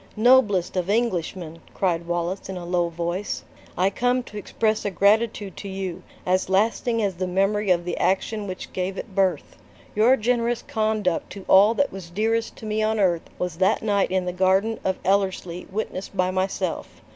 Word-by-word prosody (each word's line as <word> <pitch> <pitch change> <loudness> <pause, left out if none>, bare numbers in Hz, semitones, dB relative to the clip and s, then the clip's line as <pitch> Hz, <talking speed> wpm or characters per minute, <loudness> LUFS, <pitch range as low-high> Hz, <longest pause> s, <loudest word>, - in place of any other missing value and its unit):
"Noblest 215 -6 +4
of 180 0 -1
Englishmen!" 180 -7 -1 0.2
cried 170 -3 0
Wallace, 175 +3 -2
in 190 - -4
a 175 - -6
low 175 -1 +1
voice, 170 +4 -3 0.3
"I 190 +2 +2
come 245 +4 +1
to 210 - -13
express 215 +1 -1
a 205 - 0
gratitude 205 +1 +2
to 200 - -7
you, 190 -2 -4 0.2
as 185 +1 +1
lasting 225 +3 +1
as 200 -2 0
the 185 0 -2
memory 195 +3 +1
of 175 -1 +2
the 175 - -2
action 205 +2 0
which 185 -1 -7
gave 185 +1 -2
it 210 - -7
birth. 190 -1 0 0.4
Your 235 +5 +4
generous 240 0 0
conduct 215 -5 -1
to 195 -2 -10
all 205 +4 +6
that 285 +2 +1
was 190 -3 -8
dearest 225 +5 -1
to - - -10
me 215 0 -1
on 215 0 +1
earth 175 -4 +1
was 180 -3 -3
that 190 +3 +2
night 200 -2 +2
in 185 0 0
the 180 - -2
garden 190 +4 +2
of 190 0 0
Ellerslie 190 -2 0
witnessed 195 -1 -4
by 185 0 +2
myself. 190 +1 -3
195 Hz, 180 wpm, -24 LUFS, 180-215 Hz, 0.4 s, all